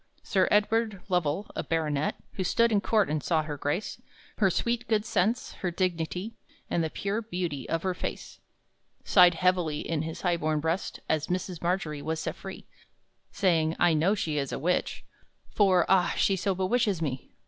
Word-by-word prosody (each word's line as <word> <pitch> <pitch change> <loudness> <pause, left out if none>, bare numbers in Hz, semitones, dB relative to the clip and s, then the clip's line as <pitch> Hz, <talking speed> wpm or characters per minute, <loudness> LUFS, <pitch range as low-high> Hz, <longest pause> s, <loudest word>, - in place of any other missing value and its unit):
Sir 190 -4 +2
Edward 210 -1 +1
Lovell, 180 +1 0
a - - -1
baronet, 155 -3 0 0.2
Who 190 - -2
stood 230 +5 +3
in 205 -2 +3
court 215 -2 +2
and 150 0 -1
saw 160 0 +1
her 150 -1 -5
grace 145 +8 -3 0.4
Her 195 -3 +4
sweet 235 +6 -1
good 215 -1 +1
sense, 225 +1 0
her 185 - 0
dignity, 180 +3 -2 0.4
And 170 - +1
the 160 - -1
pure 200 +7 -2
beauty 175 - -4
of 165 0 -1
her 185 -1 0
face, - - -6 0.6
Sighed 180 -3 +6
heavily 180 -4 +1
in 165 -3 -2
his 160 0 -5
high 175 -2 +1
born 155 -1 0
breast 165 +4 -2
As 155 -1 0
Mrs. 180 -1 -3
Margery 170 -4 -1
was 160 +2 -2
set - - -3
free, - - -9 0.7
Saying, 165 -4 +2
"I 175 -1 +4
know 170 +7 +3
she 155 -7 -1
is 140 -1 -3
a - - -2
witch, 180 +6 -1 0.5
For, 185 -4 +4
ah, 180 -2 +3
she 195 - +3
so 190 +1 -1
bewitches 200 0 +1
me!" 135 -5 -4
180 Hz, 180 wpm, -28 LUFS, 160-200 Hz, 0.7 s, Sighed